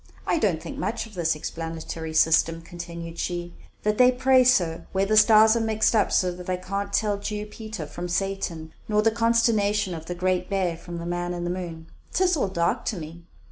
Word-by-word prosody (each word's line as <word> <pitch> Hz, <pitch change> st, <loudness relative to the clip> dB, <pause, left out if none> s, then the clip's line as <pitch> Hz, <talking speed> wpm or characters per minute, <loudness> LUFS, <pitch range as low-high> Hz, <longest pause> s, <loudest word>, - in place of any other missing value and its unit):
"I 335 Hz, -, +1 dB
don't 185 Hz, -, +1 dB
think -, -, -7 dB
much 220 Hz, +5 st, -2 dB
of 225 Hz, -, -14 dB
this 170 Hz, -4 st, 0 dB
explanatory 160 Hz, 0 st, -6 dB
system," 165 Hz, +1 st, +3 dB
continued 170 Hz, -1 st, -8 dB
she, 175 Hz, -1 st, -3 dB, 0.3 s
"that 210 Hz, +1 st, 0 dB
they 250 Hz, 0 st, +7 dB
praise 255 Hz, 0 st, +5 dB
so, 170 Hz, -9 st, 0 dB
where 195 Hz, 0 st, +2 dB
the 215 Hz, +2 st, +1 dB
stars 220 Hz, +1 st, +7 dB
are -, -, +2 dB
mixed 220 Hz, 0 st, +1 dB
up 210 Hz, -3 st, +2 dB
so 180 Hz, -1 st, +2 dB
that 180 Hz, +1 st, -9 dB
I 185 Hz, -, 0 dB
can't 200 Hz, +2 st, -4 dB
tell 205 Hz, -1 st, +1 dB
Jew 210 Hz, 0 st, -4 dB
Peter 215 Hz, -4 st, -7 dB
from 175 Hz, +4 st, -6 dB
Satan, 175 Hz, -4 st, -3 dB
nor 210 Hz, 0 st, +2 dB
the 225 Hz, -, +4 dB
consternation 220 Hz, -4 st, +2 dB
of 165 Hz, -1 st, -8 dB
the 175 Hz, -, -4 dB
Great 180 Hz, 0 st, 0 dB
Bear 190 Hz, -4 st, 0 dB
from 170 Hz, +1 st, -8 dB
the 170 Hz, -, -6 dB
man 175 Hz, 0 st, -2 dB
in 175 Hz, -, -4 dB
the 175 Hz, -, -2 dB
moon. 170 Hz, -3 st, -6 dB, 0.3 s
'Tis 365 Hz, -1 st, +3 dB
all 270 Hz, -, 0 dB
dark 170 Hz, -3 st, 0 dB
to 210 Hz, -, -2 dB
me. 165 Hz, +1 st, -9 dB
185 Hz, 210 wpm, -25 LUFS, 170-215 Hz, 0.3 s, they